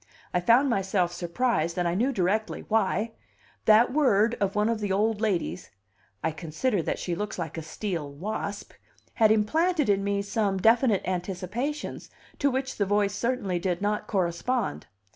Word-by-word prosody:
I 180 - +3
found 235 +10 +4
myself 190 -6 0
surprised, 170 -2 -1
and 175 -1 +1
I 170 - 0
knew 240 +9 +1
directly 210 0 0
why; 220 +1 +1 0.5
that 225 +3 +5
word 235 -6 +3
of 200 0 0
one 210 +1 +2
of 230 -1 0
the 205 -2 -2
old 210 +2 +1
ladles, 185 -4 -1 0.5
"I 160 - +1
consider 165 +7 -1
that - - -2
she 175 - -3
looks 205 +4 -4
like 165 -4 -4
a 165 - -4
steel 160 -1 -4
wasp," 200 +6 -5 0.4
had 220 -2 +4
implanted 305 - +2
in 195 -1 +2
me 200 0 0
some 200 -1 0
definite 225 +1 +3
anticipations 190 - -3 0.3
to 285 - +3
which 265 0 -2
the 205 - +1
voice 205 0 +2
certainly 210 -5 -1
did 180 -1 -1
not 210 +1 -1
correspond. 190 - -1
205 Hz, 160 wpm, -27 LUFS, 180-230 Hz, 0.5 s, that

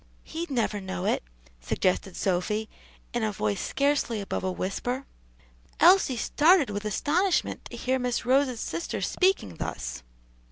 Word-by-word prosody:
"He'd 335 +2 -5
never 225 -6 0
know 190 -1 -4
it," - - +1 0.4
suggested 180 - -1
Sophy 205 +4 0 0.5
in 240 - 0
a 215 - +1
voice 105 - -1
scarcely 280 -5 +1
above 200 - -3
a 185 - 0
whisper. 245 +9 -3 0.7
Elsie 350 -7 +6
started 300 - +4
with 205 +1 -4
astonishment 345 - +1
to - - -8
hear 260 +1 0
Miss 250 -1 -1
Rose's 260 -1 +2
sister 165 +1 -3
speaking 280 - +1
thus. 60 -2 -4
230 Hz, 135 wpm, -27 LUFS, 190-280 Hz, 0.7 s, Elsie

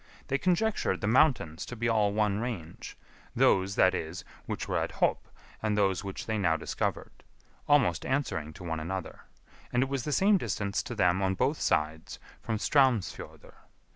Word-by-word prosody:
They 135 - +1
conjectured 190 +6 +1
the - - -3
mountains 110 - +2
to 125 - -6
be 115 0 -1
all 110 -3 +2
one 105 -1 +1
range; 100 -9 -6 0.4
those, 95 +1 +3
that 95 0 +4
is, 80 0 -4 0.2
which - - -4
were - - 0
at - - -3
Hop, - - 0 0.3
and 110 -1 0
those 95 -2 +1
which 95 -1 -6
they 110 -1 -1
now 80 -4 +2
discovered; - - -4 0.5
almost 130 - +3
answering 105 - -2
to 90 - -11
one 80 -2 -3
another; 90 +3 -6 0.5
and 125 +1 +2
it 135 - -4
was 135 -3 -2
the 150 - -3
same 195 +6 +4
distance 105 - -2
to 120 - -7
them 90 -2 +2
on 95 0 +1
both 135 +9 0
sides 80 +1 -1 0.2
from 110 -2 -2
Straumsfjordr. 130 -4 0
105 Hz, 170 wpm, -29 LUFS, 90-125 Hz, 0.5 s, that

